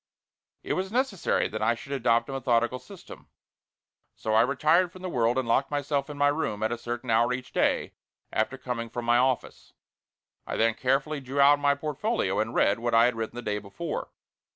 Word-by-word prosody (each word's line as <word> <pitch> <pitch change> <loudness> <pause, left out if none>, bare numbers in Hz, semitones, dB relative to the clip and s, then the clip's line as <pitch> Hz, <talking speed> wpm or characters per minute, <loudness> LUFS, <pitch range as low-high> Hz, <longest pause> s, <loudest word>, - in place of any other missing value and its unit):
It - - -2
was 190 +1 -2
necessary 245 -6 0
that 110 - -6
I 115 +2 +2
should 140 +4 -11
adopt 120 -3 +2
a - - -6
methodical 125 -1 0
system, 200 +4 -13 0.9
so 110 - -3
I 110 - +6
retired 155 +8 +3
from 185 0 -13
the 185 - -3
world 120 -1 +1
and 130 -2 0
locked 130 +4 +2
myself 145 0 -1
in 145 - -7
my 145 0 +4
room 110 -9 -2
at 110 - 0
a 120 - -2
certain 120 0 -4
hour 115 +2 +3
each 125 0 -6
day, - - +1 0.4
after 110 +5 0
coming 120 -3 -4
from 120 +1 -5
my 120 +1 +4
office. 130 0 -1 0.7
I - - -3
then 115 0 +3
carefully 135 +5 0
drew 135 +1 -5
out 145 +1 +6
my 145 0 +3
portfolio 150 - -1
and 110 +2 -2
read 100 - +3
what 120 0 0
I 115 +1 +6
had 125 -1 +1
written 115 +1 -4
the 120 - -6
day 105 -1 -2
before. 105 +11 -5
125 Hz, 200 wpm, -27 LUFS, 115-145 Hz, 0.9 s, I